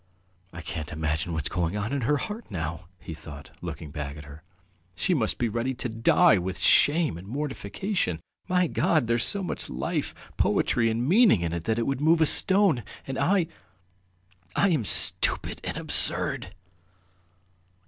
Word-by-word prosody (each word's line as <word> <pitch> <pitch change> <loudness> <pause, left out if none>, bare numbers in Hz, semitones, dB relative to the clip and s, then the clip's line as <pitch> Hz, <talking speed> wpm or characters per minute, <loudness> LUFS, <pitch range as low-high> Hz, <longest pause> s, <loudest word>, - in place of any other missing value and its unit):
"I 85 - -8
can 80 -1 -5
imagine 80 +1 -2
what's 80 -3 -2
going 90 +2 -1
on 105 +6 -3
in 140 - -1
her 145 +5 +2
heart 215 +8 -6
now!" 85 -2 -5
he 80 - -8
thought, 75 -2 -11
looking 75 -3 -7
at 75 +1 -5
her 70 -1 -11
back. 80 - -21 0.5
"She 185 - +1
must 115 -10 +1
be 120 - 0
ready 120 +4 -2
to 125 - -2
die 110 -2 +4
with 90 +1 -4
shame 150 - +3
and 95 - -12
mortification! 135 - -3 0.3
My 180 0 +2
God, 155 -4 +1
there's 115 0 +1
so 200 -1 0
much - - -5
life, 65 +2 -3 0.2
poetry, 115 -1 +2
and 115 +3 -1
meaning 200 - +5
in 85 -1 -2
it 85 0 -4
that 110 0 0
it 115 - 0
would 135 0 -2
move 160 +2 +4
a 160 - +5
stone, 190 - +3 0.2
and 135 -1 -4
I... 185 -1 +2 1.1
I 200 - +3
am 150 - +1
stupid - - +1
and - - -4
absurd!" - - +1
115 Hz, 170 wpm, -26 LUFS, -, 1.1 s, meaning